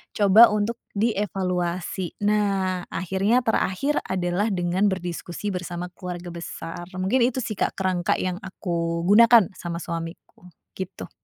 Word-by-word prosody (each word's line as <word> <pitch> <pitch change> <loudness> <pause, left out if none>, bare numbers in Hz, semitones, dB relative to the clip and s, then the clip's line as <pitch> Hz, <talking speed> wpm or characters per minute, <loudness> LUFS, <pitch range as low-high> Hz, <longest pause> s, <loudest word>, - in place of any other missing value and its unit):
coba 210 +3 +7
untuk 210 +2 -1 0.2
dievaluasi. 185 -4 -1
Nah, 195 -3 +1
akhirnya 190 +7 +1
terakhir 225 +6 +1
adalah 185 +2 0
dengan 180 +2 +1
berdiskusi 180 +2 -4
bersama 180 -1 -5
keluarga 180 -1 -7
besar, 170 0 -7
mungkin 195 +7 +2
itu, 255 +1 -1
sih, 215 -3 -4
Kak, - - +1
kerangka 185 -2 +1
yang 185 -1 -2
aku 170 -3 -2
gunakan 230 +1 +7
sama 170 -1 -5
suamiku, 165 +1 -7 0.3
gitu. 190 0 -6
185 Hz, 125 wpm, -24 LUFS, 175-205 Hz, 0.3 s, coba